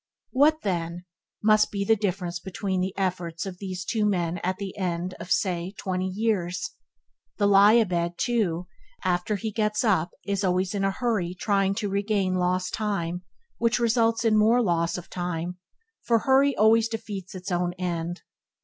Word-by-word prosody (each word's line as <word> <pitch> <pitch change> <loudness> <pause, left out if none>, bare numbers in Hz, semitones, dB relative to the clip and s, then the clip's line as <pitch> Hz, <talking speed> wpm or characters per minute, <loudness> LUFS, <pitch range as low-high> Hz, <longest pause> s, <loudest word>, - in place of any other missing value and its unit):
What, 300 +4 +3
then, 175 -2 -2 0.4
must 215 0 +5
be 200 -1 -2
the 225 - +5
difference 180 -4 -2
between 190 0 -3
the 190 +1 -3
efforts 180 -3 -2
of 185 -2 -7
these 185 -2 -5
two 220 +2 0
men 175 -4 0
at 185 +1 -2
the 195 -2 -6
end, 180 -1 -2
say, 175 -2 0
of 195 - -11
twenty 185 -1 -2
years! 190 -3 -1 0.7
The 205 - +2
lie 200 +1 +7
a 235 -1 +5
bed, 170 -2 -1
too, 190 -8 0 0.4
after 180 +3 0
he 220 +2 -3
gets 215 0 0
up 185 -7 +2 0.2
is 200 0 -1
always 185 0 +1
in 200 -1 -1
a 195 - +3
hurry 195 -5 -1
trying 195 -2 +1
to 210 -1 -2
regain 200 -1 0
lost 185 0 0
time, 180 -5 -2 0.4
which 230 0 +2
results 230 -1 +2
in 220 -1 +4
more 225 +3 +5
loss 170 -3 +1
of 180 - -8
time, 175 0 -4 0.4
for 235 - +3
hurry 270 +3 +3
always 220 +2 +5
defeats 205 -5 -6
its 185 0 -6
own 175 0 0
end. 175 -1 -3
190 Hz, 170 wpm, -26 LUFS, 180-215 Hz, 0.7 s, lie